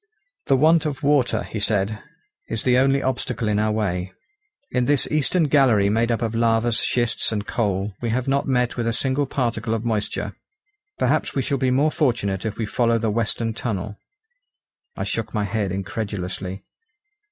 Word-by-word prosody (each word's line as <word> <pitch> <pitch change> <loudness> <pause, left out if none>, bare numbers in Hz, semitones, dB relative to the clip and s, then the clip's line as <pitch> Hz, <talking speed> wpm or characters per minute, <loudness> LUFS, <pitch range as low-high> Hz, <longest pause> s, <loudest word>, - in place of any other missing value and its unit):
"The 135 - +4
want 160 +3 +4
of 140 -2 -5
water," 140 -3 +2
he 110 - -5
said, 105 +1 0 0.5
"is 115 - -2
the 125 0 +4
only 135 +1 +3
obstacle 130 -3 -2
in 105 0 +1
our 110 0 +1
way. 95 -4 -1 0.6
In 125 -1 +1
this 145 0 +2
eastern 155 +4 +2
gallery 130 -9 +4
made 115 +3 +1
up 115 - 0
of 115 -1 -1
lavas, 115 0 +2
schists, 120 -2 +1
and 105 -2 -2
coal, 100 -3 -1
we 120 - -1
have 125 +3 -1
not 140 +1 +1
met 125 -2 +1
with 120 -1 -1
a 115 - +1
single 135 +3 0
particle 120 -3 -1
of 115 +1 -4
moisture. 110 -3 -2 0.6
Perhaps - - +1
we 135 - +1
shall 140 +2 -1
be 130 -1 +2
more 140 +5 +3
fortunate 115 - 0
if 110 - -3
we 115 - -1
follow 115 +2 +1
the 110 -1 0
western 115 +1 -1
tunnel." 105 -3 -3 1.0
I - - -3
shook - - -3
my 105 - +1
head 100 -1 -1
incredulously. 95 -1 -4
115 Hz, 175 wpm, -23 LUFS, 105-130 Hz, 1.0 s, The